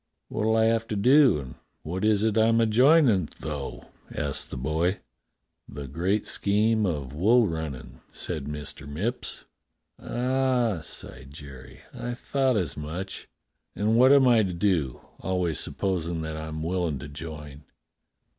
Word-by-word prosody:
"What'll 110 +1 0
I 110 - +4
have 115 0 +2
to 105 - -3
do 130 - +5
and 65 -4 -7 0.3
what 90 +5 -4
is 105 -1 +3
it 110 -2 +1
I'm 115 +1 +4
a 115 - +4
joinin', 120 - +4
though?" 70 -6 -5 0.3
asked 70 -1 -2
the - - -6
boy. 80 +8 0 0.7
"The 70 0 -7
great 90 +9 -1
scheme 105 +1 +2
of 70 -6 -3
wool 110 +9 +4
runnin'," 80 -6 -6
said 70 - -4
Mr. 75 -1 -6
Mipps. 105 - -4 0.6
"Ah," 125 -5 0
sighed 65 -3 -10
Jerry, 70 -3 -12
"I 120 0 -5
thought 135 -1 0
as 85 -8 -1
much. 80 +6 -6 0.5
And 110 +2 +1
what 130 +3 +6
am 140 -2 +6
I 120 -3 +5
to 95 -4 -1
do, 85 -7 0 0.2
always 90 -5 -1
supposin' 85 -4 -2
that 80 0 -4
I'm 80 0 -5
willin' 85 -3 -1
to 65 +2 -8
join.' 75 -1 -9
90 Hz, 145 wpm, -26 LUFS, 75-110 Hz, 0.7 s, what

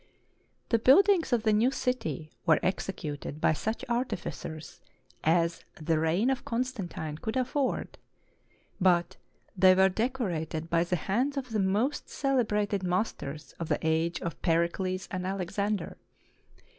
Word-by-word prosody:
The 230 - +3
buildings 355 - +5
of 235 -3 +2
the 215 -2 +3
new 220 +4 +4
city 165 - -2 0.2
were 160 -2 +5
executed 155 -6 -3
by 155 - +3
such 220 +8 -3
artificers 235 -9 -4 0.4
as 165 +1 +2 0.2
the 160 0 +1
reign 175 +11 +2
of 265 - -2
Constantine 215 - -3
could 220 +7 -3
afford; 260 +1 -1 0.8
but 175 -2 +2 0.4
they 185 0 +6
were 190 +1 +5
decorated 180 - -2
by 170 0 +3
the 180 - 0
hands 245 - -1
of 255 -3 -4
the 220 - 0
most 205 +9 0
celebrated 210 -7 0
masters 175 -5 -3
of 165 - -4
the - - +2
age 160 +1 +1
of 170 - -5
Pericles 185 +2 0
and 185 -1 -3
Alexander. 195 +1 -2
190 Hz, 130 wpm, -29 LUFS, 165-235 Hz, 0.8 s, they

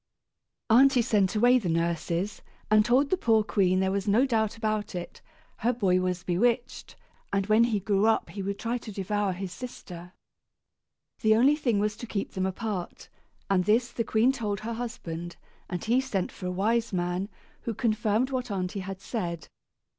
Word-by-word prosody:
Aunty 250 +2 +5
sent 205 -6 +1
away 245 +4 +5
the 190 -7 -3
nurses, 170 +3 -1 0.3
and 215 0 +6
told 255 +5 +2
the 370 - +3
poor 225 -9 +3
queen 185 -3 +2
there 190 0 +1
was 200 +1 -2
no 220 +6 +4
doubt 225 -4 0
about 215 -2 -2
it; 175 -1 -7 0.4
her 240 - +1
boy 195 -7 +2
was 180 -1 -2
bewitched, 235 +7 -1 0.4
and 195 -1 +1
when 215 +3 +4
he 220 -4 0
grew 200 +1 +1
up 225 - +1
he 200 - -5
would 200 +1 -3
try 235 +1 -2
to 220 - -9
devour 205 0 -1
his 185 0 -5
sister. 180 -5 -9 1.1
The 220 0 +4
only 265 +6 +5
thing 240 -8 0
was 210 +1 0
to 240 - -7
keep 200 -3 -3
them 190 -1 -1
apart, 190 -2 -5 0.4
and 185 -2 +2
this 235 +4 +2
the 235 - -2
queen 225 +3 +3
told 210 -6 -3
her 230 +2 -4
husband; 175 -8 -6 0.3
and 175 -1 -4
he 240 +4 +3
sent 205 -9 -2
for 180 - -7
a - - -1
wise 225 +5 0
man, 180 +1 -2 0.3
who 230 - -4
confirmed 220 +3 +1
what 250 -2 -2
aunty 190 -1 -3
had 190 0 -6
said. 175 - -4
210 Hz, 180 wpm, -27 LUFS, 185-235 Hz, 1.1 s, and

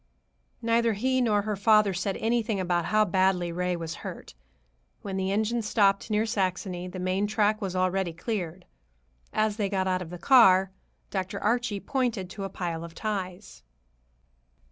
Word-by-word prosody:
Neither 230 0 +2
he 260 +5 +1
nor 210 -4 +2
her 210 0 -2
father 210 0 +4
said 185 +2 -2
anything 225 -2 0
about 175 -2 0
how 215 +2 +3
badly 185 -2 +1
Ray 180 +1 -1
was 165 -1 -5
hurt. - - -8 0.7
When 195 -2 -4
the 190 0 -1
engine 220 +3 0
stopped 200 -1 +2
near 215 +1 +1
Saxony, 185 -3 -2
the 180 - -8
main 185 +3 0
track 215 0 +1
was 190 -2 -3
already 185 -1 0
cleared. 175 -1 -4 0.7
As 215 -1 0
they 205 -3 0
got 190 -1 0
out 185 -1 0
of 175 - -7
the 180 - -7
car, 190 -4 +6 0.4
Dr. 190 +1 -3
Archie 230 -1 0
pointed 235 -9 -2
to 200 - -6
a - - -4
pile 170 -3 -4
of 170 -1 -10
ties. 195 -2 -5
195 Hz, 165 wpm, -27 LUFS, 185-215 Hz, 0.7 s, car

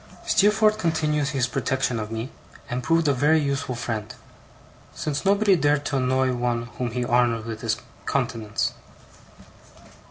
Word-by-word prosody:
Steerforth 215 +1 +3
continued 155 -5 +1
his 135 -2 0
protection 125 -1 -1
of 110 0 -5
me, 115 +3 -4 0.4
and 125 +1 -1
proved 165 +4 +2
a 145 - +4
very 150 +5 +3
useful 140 -3 -2
friend; 115 -3 -4 0.8
since 145 -1 -3
nobody 200 0 +4
dared 145 -2 +1
to 145 - 0
annoy 130 0 +1
one 120 -1 -1 0.2
whom 125 -1 -1
he 120 +1 -2
honoured 120 -2 +2
with 110 -1 -6
his - - 0 0.3
countenance. 110 -2 -1
130 Hz, 140 wpm, -24 LUFS, 120-150 Hz, 0.8 s, a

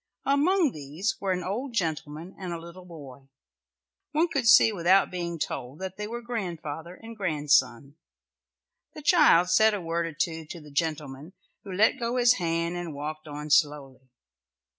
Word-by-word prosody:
Among 305 +3 +3
these 155 +8 -4
were 195 -1 -1
an 180 -1 -1
old 235 +7 -4
gentleman 160 -2 -3
and 185 -2 -5
a 170 - -4
little 170 +2 -12
boy. 140 -6 -12 0.9
One 325 +3 +2
could 265 -6 -1
see 225 -2 +7
without 185 +1 +3
being 170 -2 -4
told 130 -3 -5
that 190 +1 -6
they 210 0 -4
were 235 +2 -6
grandfather 175 -7 -5
and 230 +2 -11
grandson. 145 - 0 1.0
The 305 - -9
child 275 - +5
said 220 -1 +5
a - - -3
word 170 -1 -2
or 165 - -7
two 165 0 -3
to 170 - -8
the 150 -2 -14
gentleman, 150 0 -3 0.3
who 195 - -9
let 215 +8 +2
go 235 +1 -2
his 245 -1 +4
hand 170 0 -1
and 170 -4 -6
walked 155 +2 -6
on 150 0 -7
slowly. 140 -4 +1
170 Hz, 165 wpm, -27 LUFS, 150-215 Hz, 1.0 s, see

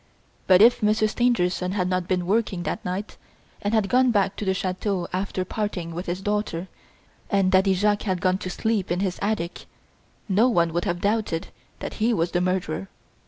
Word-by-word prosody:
But 185 +2 +7
if 240 +1 +5
Monsieur 215 +1 +3
Stangerson 190 -6 +1
had 185 -3 0
not 185 -1 -1
been 180 -1 0
working 195 -2 0
that - - -3
night 185 +3 -4 0.4
and 205 - -1
had 220 -3 +2
gone 255 +4 +4
back 200 -4 +1
to 210 - -4
the 190 0 +1
chateau 185 0 -2
after 185 0 -2
parting 185 -5 -3
with 175 +3 -5
his 175 +2 -3
daughter, 205 -4 -2 0.6
and 195 -2 +2
Daddy 190 0 +4
Jacques 205 +2 +2
had 185 -3 -1
gone 185 +1 +1
to 185 - -5
sleep 215 0 -1
in 180 +2 0
his 185 -3 -2
attic, 200 -4 -2 0.6
no 215 +5 +4
one 170 -7 +2
would 175 +1 -1
have 175 0 -2
doubted 205 -5 -1 0.3
that - - -5
he 230 +1 +3
was 170 -1 0
the 175 - +1
murderer. 185 0 -2
190 Hz, 190 wpm, -24 LUFS, 180-210 Hz, 0.6 s, But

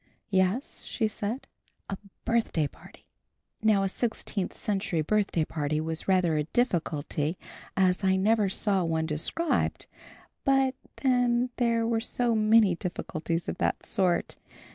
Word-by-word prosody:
"Yes," 190 +7 +1
she 225 - 0
said, 215 +4 -3 0.4
"a 195 - -3 0.3
birthday 230 -9 +1
party." - - -17 0.6
Now 215 -3 +4
a - - +2
sixteenth 210 -2 -2
century 195 -5 -1
birthday 195 -2 +1
party 155 -1 -1
was 160 +1 -4
rather 180 -4 +3
a 150 - 0
difficulty 160 - 0 0.4
as 185 0 +3
I 190 0 +4
never 205 +1 +3
saw 195 -1 +1
one 160 -1 0
described; 160 - -1 0.6
but 270 -1 +3 0.3
then 245 -1 +2
there 230 -2 +2
were 230 0 +1
so 240 0 0
many 215 -2 +5
difficulties 170 -2 -3
of - - -4
that - - 0
sort. 185 -4 +1
195 Hz, 130 wpm, -28 LUFS, 170-230 Hz, 0.6 s, many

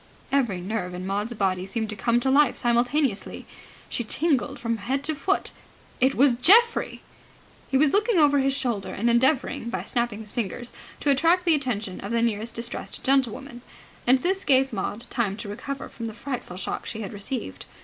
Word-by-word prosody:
Every 240 -10 +1
nerve 180 -2 -3
in 180 +1 -6
Maud's 205 +5 -2
body 185 -3 0
seemed 215 +3 -3
to - - -5
come 235 +4 +1
to 265 - +1
life 290 +2 +4
simultaneously. 240 0 0 0.4
She 240 - -2
tingled 280 +2 0
from 230 -2 -2
head 265 +6 -2
to 315 - 0
foot. 310 +7 -1 0.5
It 260 +2 +3
was 275 -1 +5
Geoffrey! 435 - +4 0.7
He 270 - +2
was 285 0 +4
looking 425 0 +3
over 290 -3 +5
his 270 0 +2
shoulder 235 -7 -2
and 235 +4 0
endeavouring 250 -1 +1
by 190 -5 -3
snapping 235 0 -2
his 210 -1 -8
fingers 240 +1 -4 0.3
to 285 - +3
attract 335 +6 +3
the 335 - +5
attention 225 -10 -2
of 200 - -6
the 230 0 +1
nearest 225 0 -1
distressed 235 +1 -4
gentlewoman; 265 -1 0 0.5
and 255 +2 +6
this 380 +7 -1
gave 270 -1 +3
Maud 230 +4 -3
time 205 -4 -1
to 230 - -7
recover 270 +7 -5
from 230 -1 -7
the 220 - -7
frightful 245 -9 -6
shock - - -4
she 220 - -5
had 200 - -6
received. 200 - -5
240 Hz, 185 wpm, -25 LUFS, 215-275 Hz, 0.7 s, and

